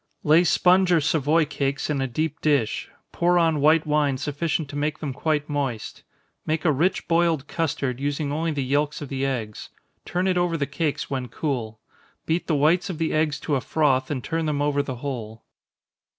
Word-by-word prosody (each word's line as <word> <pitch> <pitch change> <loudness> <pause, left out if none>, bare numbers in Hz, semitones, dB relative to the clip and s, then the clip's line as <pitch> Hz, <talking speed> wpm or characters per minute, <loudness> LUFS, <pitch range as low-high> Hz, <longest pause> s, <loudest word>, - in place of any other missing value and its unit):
_ - - -6
Lay 160 +3 +6
sponge 180 +1 +4
or 170 - +5
Savoy 155 +1 +2
cakes 140 -1 -2
in 145 -3 -1
a 135 - 0
deep 155 +4 -3
dish 140 -8 +1 0.2
pour 175 +1 +2
on 165 -4 +2
white 155 +2 +4
wine 150 -3 +1
sufficient 145 +3 -2
to 145 - -8
make 150 +1 -1
them 145 -4 -4
quite 150 +1 -1
moist. 135 -7 -3 0.4
Make 155 +2 -2
a 160 - +5
rich 160 +7 0
boiled 165 -4 +2
custard, 140 -6 -2
using 145 +1 -2
only 160 +3 -1
the 145 -3 -1
yelks 145 +3 0
of 140 - -8
the 135 0 -1
eggs 110 -6 -4 0.3
turn 180 +2 -1
it 180 -1 +2
over 175 -1 +1
the 145 - 0
cakes 145 +1 -3
when 130 -2 -2
cool 120 -7 -3 0.5
beat 165 +2 -1
the 160 - +1
whites 165 +6 +2
of 175 - -4
the 165 0 -1
eggs 155 -2 +1
to 150 - -2
a 130 - 0
froth, 135 -3 +1
and 135 -5 -3
turn 165 -1 -2
them 150 -2 -1
over 145 0 +1
the 135 -2 -5
whole. 115 -5 -5
150 Hz, 200 wpm, -24 LUFS, 140-160 Hz, 0.5 s, Lay